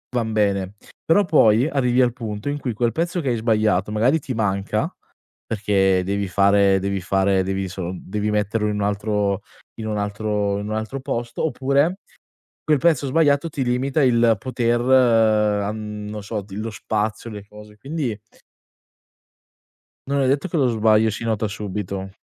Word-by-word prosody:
van 115 Hz, -2 st, 0 dB
bene, 100 Hz, -2 st, 0 dB, 0.3 s
però 200 Hz, +5 st, +4 dB
poi 120 Hz, -5 st, +4 dB
arrivi 125 Hz, -3 st, +2 dB
al 125 Hz, -, +3 dB
punto 110 Hz, +1 st, -5 dB
in 145 Hz, -, -2 dB
cui, 125 Hz, -5 st, -3 dB
quel 120 Hz, +2 st, 0 dB
pezzo 170 Hz, -, -1 dB
che 135 Hz, -, -1 dB
hai 120 Hz, -, +1 dB
sbagliato, 110 Hz, -3 st, +1 dB
magari 120 Hz, +9 st, +2 dB
ti 135 Hz, -3 st, -5 dB
manca 100 Hz, -3 st, -1 dB, 0.6 s
perché 95 Hz, -3 st, +1 dB
devi 100 Hz, 0 st, -2 dB
fare 100 Hz, +1 st, +4 dB
devi 100 Hz, 0 st, -2 dB
fare 95 Hz, +1 st, +1 dB
devi 95 Hz, +1 st, -2 dB
solo 90 Hz, -1 st, -5 dB
devi 105 Hz, +2 st, -3 dB
metterlo 105 Hz, +1 st, 0 dB
in 105 Hz, -, -1 dB
un 105 Hz, -, -2 dB
altro 105 Hz, -1 st, 0 dB, 0.4 s
in 110 Hz, -, -4 dB
un 105 Hz, -1 st, -2 dB
altro 105 Hz, 0 st, -1 dB
in 105 Hz, -, -5 dB
un 110 Hz, -, -2 dB
altro 110 Hz, +5 st, -4 dB
posto, 120 Hz, 0 st, -3 dB
oppure 145 Hz, +4 st, +1 dB, 0.6 s
quel 150 Hz, -2 st, +2 dB
prezzo 145 Hz, -1 st, +2 dB
sbagliato 145 Hz, +1 st, +2 dB
ti 145 Hz, -4 st, -3 dB
limita 130 Hz, +4 st, 0 dB
il 115 Hz, -2 st, +4 dB
poter 120 Hz, 0 st, 0 dB
an 110 Hz, -4 st, +2 dB
non 105 Hz, 0 st, -6 dB
so, 105 Hz, 0 st, -4 dB
d 100 Hz, 0 st, -16 dB
lo 110 Hz, +3 st, -4 dB
spazio, 110 Hz, +2 st, -3 dB
le 105 Hz, -2 st, -8 dB
cose, 105 Hz, 0 st, -14 dB
quindi 135 Hz, -3 st, -3 dB, 1.9 s
non 140 Hz, 0 st, +1 dB
è 130 Hz, -, +2 dB
detto 140 Hz, +6 st, +1 dB
che 175 Hz, -, -5 dB
lo 135 Hz, -5 st, +3 dB
sbaglio 110 Hz, -1 st, +3 dB
si 110 Hz, +2 st, -5 dB
nota 110 Hz, -2 st, -1 dB
subito. 100 Hz, -2 st, -5 dB
110 Hz, 165 wpm, -22 LUFS, 100-125 Hz, 1.9 s, però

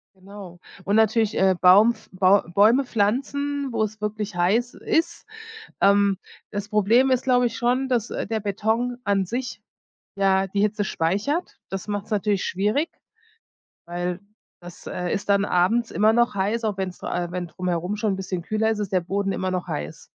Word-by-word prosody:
Genau. 190 Hz, -2 st, -12 dB, 0.3 s
Und 205 Hz, -, +1 dB
natürlich, 220 Hz, 0 st, +2 dB
äh, 190 Hz, -1 st, +3 dB
Baum 205 Hz, +6 st, +6 dB
pf 220 Hz, -, -20 dB
Bau 190 Hz, +2 st, +4 dB
Bäume 230 Hz, +8 st, +5 dB
pflanzen, 275 Hz, +6 st, -1 dB
wo 220 Hz, -1 st, +1 dB
es 215 Hz, 0 st, -4 dB
wirklich 210 Hz, -1 st, -4 dB
heiß 205 Hz, +8 st, +1 dB
ist. 335 Hz, +3 st, -1 dB, 0.6 s
Ähm, 200 Hz, -1 st, +4 dB, 0.3 s
das 205 Hz, 0 st, -5 dB
Problem 225 Hz, +5 st, +3 dB
ist, 255 Hz, -, +2 dB
glaube 250 Hz, -1 st, +3 dB
ich, 225 Hz, -1 st, -4 dB
schon, 250 Hz, +3 st, 0 dB
dass, 240 Hz, -3 st, 0 dB
äh, -, -, -3 dB
der 220 Hz, -1 st, -2 dB
Beton 220 Hz, +5 st, -1 dB
an 200 Hz, -1 st, +1 dB
sich 250 Hz, +6 st, -5 dB, 0.5 s
ja 195 Hz, -1 st, +2 dB
die 200 Hz, +1 st, -1 dB
Hitze 210 Hz, -1 st, 0 dB
speichert. 205 Hz, -, -2 dB
Das 195 Hz, +2 st, -6 dB
macht's 205 Hz, +1 st, -4 dB
natürlich 205 Hz, -1 st, 0 dB
schwierig, 210 Hz, -, 0 dB, 1.0 s
weil 175 Hz, +1 st, -3 dB, 0.4 s
das, 175 Hz, 0 st, -12 dB
äh, 180 Hz, -1 st, -4 dB
ist 205 Hz, -, -3 dB
dann 200 Hz, 0 st, +4 dB
abends 220 Hz, +7 st, +1 dB
immer 215 Hz, +2 st, +3 dB
noch 240 Hz, -2 st, +2 dB
heiß, 210 Hz, +4 st, -1 dB
auch 210 Hz, -3 st, -1 dB
wenn's 185 Hz, -2 st, -4 dB
äh, 175 Hz, 0 st, -3 dB
wenn 180 Hz, -1 st, -4 dB
drumherum 180 Hz, +3 st, -3 dB
schon 210 Hz, -2 st, -1 dB
'n -, -, -2 dB
bisschen 185 Hz, -2 st, -4 dB
kühler 215 Hz, +2 st, 0 dB
ist, 220 Hz, -, 0 dB
ist 200 Hz, -2 st, -3 dB
der 185 Hz, -, +3 dB
Boden 195 Hz, +2 st, -2 dB
immer 185 Hz, 0 st, -2 dB
noch 180 Hz, -1 st, -3 dB
heiß. 75 Hz, +1 st, -6 dB
205 Hz, 180 wpm, -23 LUFS, 190-230 Hz, 1.0 s, Baum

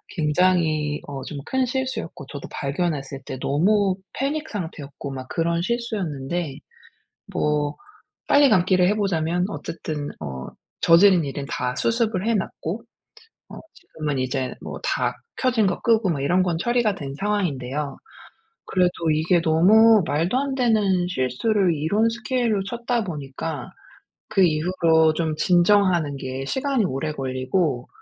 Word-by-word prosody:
굉장히 155 Hz, -2 st, +1 dB
어 140 Hz, -2 st, -6 dB
좀 150 Hz, -, -7 dB
큰 260 Hz, 0 st, +1 dB
실수였고 260 Hz, -, -4 dB
저도 140 Hz, -, -7 dB
발견했을 140 Hz, -2 st, -3 dB
때 -, -, -5 dB
너무 190 Hz, +6 st, +2 dB, 0.2 s
패닉 300 Hz, +4 st, -2 dB
상태였고 155 Hz, -8 st, -6 dB
막 130 Hz, -1 st, -7 dB
그런 170 Hz, 0 st, 0 dB
실수였는데 175 Hz, -, -3 dB, 0.8 s
뭐 150 Hz, -1 st, 0 dB, 0.5 s
빨리 285 Hz, 0 st, +6 dB
감기를 185 Hz, -2 st, +4 dB
해 205 Hz, -, +2 dB
보자면 175 Hz, -4 st, 0 dB
어쨌든 155 Hz, -6 st, -5 dB
어 65 Hz, -4 st, -6 dB, 0.3 s
저지른 175 Hz, 0 st, +6 dB
일은 140 Hz, 0 st, -5 dB
다 125 Hz, 0 st, -2 dB
수습을 225 Hz, -4 st, 0 dB
해 230 Hz, -, +2 dB
놨고 195 Hz, 0 st, -3 dB, 0.7 s
어 -, -, -10 dB, 0.2 s
지금은 155 Hz, -, -4 dB
이제 130 Hz, 0 st, -2 dB
뭐 -, -, -7 dB
다 -, -, 0 dB, 0.2 s
켜진 245 Hz, -5 st, +2 dB
거 180 Hz, -, -2 dB
끄고 225 Hz, -4 st, +3 dB
뭐 155 Hz, -5 st, -1 dB
이런 175 Hz, +7 st, +2 dB
건 175 Hz, -3 st, 0 dB
처리가 235 Hz, 0 st, +1 dB
된 140 Hz, -6 st, -6 dB
상황인데요. 150 Hz, -9 st, -2 dB, 0.7 s
그래도 180 Hz, -3 st, +1 dB
이게 165 Hz, +3 st, +2 dB
너무 205 Hz, +7 st, +5 dB
말도 165 Hz, -, +1 dB
안 275 Hz, 0 st, -1 dB
되는 210 Hz, -8 st, +2 dB
실수를 180 Hz, -, +1 dB
이런 200 Hz, +10 st, +1 dB
스케일로 230 Hz, -2 st, -1 dB
쳤다 235 Hz, +1 st, -1 dB
보니까 150 Hz, -4 st, -5 dB, 0.6 s
그 195 Hz, -, +2 dB
이후로 160 Hz, -1 st, +3 dB
좀 160 Hz, -1 st, -1 dB
진정하는 175 Hz, -3 st, +3 dB
게 130 Hz, 0 st, -5 dB
시간이 265 Hz, -, 0 dB
오래 155 Hz, -1 st, -2 dB
걸리고 130 Hz, +1 st, -1 dB
175 Hz, 275 characters per minute, -23 LUFS, 145-210 Hz, 0.8 s, 빨리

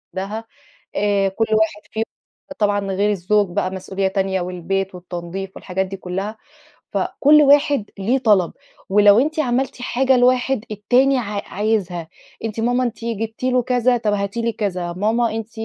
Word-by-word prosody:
وحدها. 210 Hz, +4 st, -4 dB, 0.5 s
آآ 200 Hz, -1 st, +2 dB
كل 225 Hz, +4 st, -1 dB
واحد 215 Hz, -1 st, +1 dB
فيهم 220 Hz, +1 st, -1 dB, 0.5 s
طبعًا 205 Hz, -1 st, +2 dB
غير 205 Hz, +2 st, +1 dB
الزوج 205 Hz, +1 st, +1 dB
بقى 185 Hz, -, +1 dB
مسؤولية 190 Hz, +1 st, -2 dB
تانية، 190 Hz, -1 st, -1 dB
والبيت 185 Hz, +2 st, -2 dB
والتنضيف 180 Hz, +2 st, -6 dB
والحاجات 190 Hz, +1 st, -2 dB
دي 195 Hz, +1 st, -6 dB
كلها، 190 Hz, +4 st, -4 dB, 0.6 s
فكل 300 Hz, +2 st, +4 dB
واحد 285 Hz, -5 st, +4 dB
ليه 235 Hz, +7 st, +1 dB
طلب، 205 Hz, -8 st, +3 dB, 0.4 s
ولو 205 Hz, +1 st, +6 dB
أنتِ 310 Hz, +4 st, 0 dB
عملتِ 250 Hz, -1 st, -1 dB
حاجة 260 Hz, +1 st, +2 dB
لواحد 250 Hz, -1 st, +2 dB
التاني 255 Hz, +6 st, +3 dB
ع 210 Hz, -4 st, -3 dB
عايزها. 190 Hz, -5 st, -1 dB, 0.4 s
أنتِ 225 Hz, 0 st, -4 dB
ماما 245 Hz, +2 st, +1 dB
أنتِ 235 Hz, -1 st, -4 dB
جبتِ 225 Hz, +1 st, -4 dB
له 255 Hz, -1 st, +3 dB
كذا 250 Hz, 0 st, +2 dB
طب 215 Hz, -3 st, 0 dB
هاتي 200 Hz, +3 st, -2 dB
لي 230 Hz, 0 st, 0 dB
كذا. 180 Hz, -5 st, -3 dB
ماما 220 Hz, +4 st, +1 dB
أنتِ 225 Hz, 0 st, -5 dB
210 Hz, 155 wpm, -20 LUFS, 195-240 Hz, 0.6 s, ولو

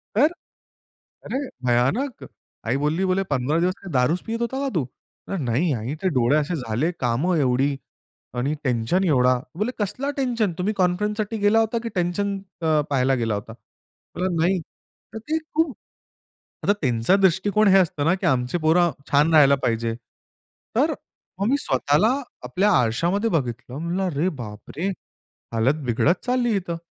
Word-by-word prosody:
तर 275 Hz, +7 st, +6 dB, 1.0 s
अरे! 270 Hz, +1 st, -3 dB, 0.2 s
भयानक. 135 Hz, -, +1 dB, 0.4 s
आई 120 Hz, +4 st, +1 dB
बोलली 150 Hz, +6 st, 0 dB
बोले 190 Hz, +1 st, +1 dB
"15 140 Hz, +4 st, +1 dB
दिवस 180 Hz, +2 st, +1 dB
काय 195 Hz, -, -7 dB
दारूच 130 Hz, +8 st, +2 dB
पित 230 Hz, +1 st, -3 dB
होता 265 Hz, +3 st, -2 dB
का 275 Hz, -, -1 dB
तू?" 145 Hz, -7 st, +1 dB, 0.5 s
"नाही 140 Hz, +5 st, +1 dB
आई, 120 Hz, +6 st, -3 dB
ते 185 Hz, -, +3 dB
डोळे 125 Hz, +4 st, +3 dB
असे 155 Hz, +4 st, -1 dB
झाले. 130 Hz, +3 st, -1 dB
कामं 135 Hz, +9 st, +1 dB
एवढी 135 Hz, +1 st, +2 dB, 0.6 s
आणि 135 Hz, +5 st, 0 dB
टेन्शन 125 Hz, +8 st, +1 dB
एवढा." 125 Hz, -3 st, +4 dB, 0.2 s
बोलली 215 Hz, +5 st, 0 dB
"कसला 210 Hz, +8 st, -2 dB
टेन्शन. 235 Hz, -8 st, 0 dB
तुम्ही 200 Hz, +4 st, 0 dB
कॉन्फरन्ससाठी 210 Hz, +4 st, 0 dB
गेला 205 Hz, +2 st, +3 dB
होता 225 Hz, +1 st, +1 dB
की 230 Hz, -, -3 dB
टेन्शन 195 Hz, +3 st, 0 dB, 0.2 s
अ, 155 Hz, -2 st, +3 dB
पाहायला 135 Hz, -1 st, +2 dB
गेला 115 Hz, -3 st, -1 dB
होता." 105 Hz, +2 st, -6 dB, 0.6 s
म्हणलं 180 Hz, -1 st, -1 dB
"नाही." 180 Hz, +2 st, +2 dB, 0.5 s
तर 220 Hz, -, -5 dB
ते 320 Hz, -, +2 dB, 0.2 s
खूप 320 Hz, -4 st, +1 dB, 0.9 s
आता 205 Hz, -, +4 dB
त्यांचा 120 Hz, +7 st, +3 dB
दृष्टिकोन 195 Hz, +2 st, +3 dB
हे 195 Hz, -, +7 dB
असतं 160 Hz, -6 st, +1 dB
ना, 165 Hz, -, +4 dB
की 190 Hz, -, -3 dB
आमची 125 Hz, +5 st, +1 dB
पोरं 170 Hz, +2 st, +3 dB, 0.2 s
छान 150 Hz, +3 st, +4 dB
राहायला 140 Hz, -3 st, +7 dB
पाहिजे. 115 Hz, 0 st, 0 dB, 0.8 s
तर -, -, +3 dB, 0.5 s
मग 200 Hz, -, +1 dB
मी 280 Hz, -, +3 dB
स्वतःला 145 Hz, -, +2 dB, 0.4 s
आपल्या 205 Hz, +2 st, +1 dB
आरशामध्ये 170 Hz, -, +1 dB
बघितलं. 125 Hz, -, -2 dB
म्हणलं 170 Hz, +4 st, -2 dB
"अरे 165 Hz, 0 st, 0 dB
बाप 105 Hz, -2 st, -9 dB
रे! 180 Hz, +5 st, -1 dB, 0.7 s
हालत 130 Hz, +7 st, +1 dB
बिघडत 135 Hz, +9 st, +1 dB
चालली 245 Hz, -3 st, +1 dB
इथं." 170 Hz, -3 st, -4 dB
170 Hz, 155 wpm, -23 LUFS, 130-200 Hz, 1.0 s, हे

